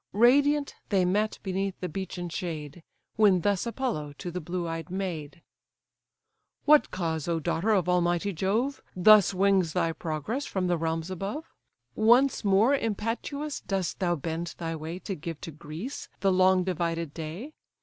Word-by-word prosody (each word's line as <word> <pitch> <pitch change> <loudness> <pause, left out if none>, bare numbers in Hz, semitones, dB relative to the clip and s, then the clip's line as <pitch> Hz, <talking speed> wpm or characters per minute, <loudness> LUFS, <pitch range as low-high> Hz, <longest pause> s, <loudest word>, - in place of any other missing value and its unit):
Radiant 280 +6 +4 0.2
they 190 -3 +3
met, 210 +4 +1
beneath 195 0 -2
the 180 - -3
beechen 180 0 -5
shade; 165 -2 -5 0.4
When 200 -5 +5
thus 200 +3 +1
Apollo 230 - -3
to 175 - -5
the 180 +1 -4
blue 175 +2 -3
eyed 165 +1 -5
maid: 175 -4 -5 1.2
"What 300 0 +6
cause, 165 -4 -2
O 170 -1 0
daughter 165 +6 -1
of 195 -5 +3
Almighty 180 +2 +1
Jove! 220 - 0
Thus 205 +2 +7
wings 190 -3 +2
thy 165 - +1
progress 170 - -3
from 190 -2 -1
the 175 -1 +1
realms 165 +2 -2
above? 200 - -5 0.4
Once 240 +5 +4
more 205 +6 +4
impetuous 255 +5 -2
dost 190 -3 -2
thou 175 -2 +1
bend 165 +2 -4
thy 165 -1 -3
way, 160 +2 -5
To 195 +2 -5
give 165 -2 -6
to 165 - -6
Greece 155 - -7
the 195 0 +3
long 185 0 +4
divided 170 -3 -2
day? 170 - -6
185 Hz, 155 wpm, -28 LUFS, 165-210 Hz, 1.2 s, Thus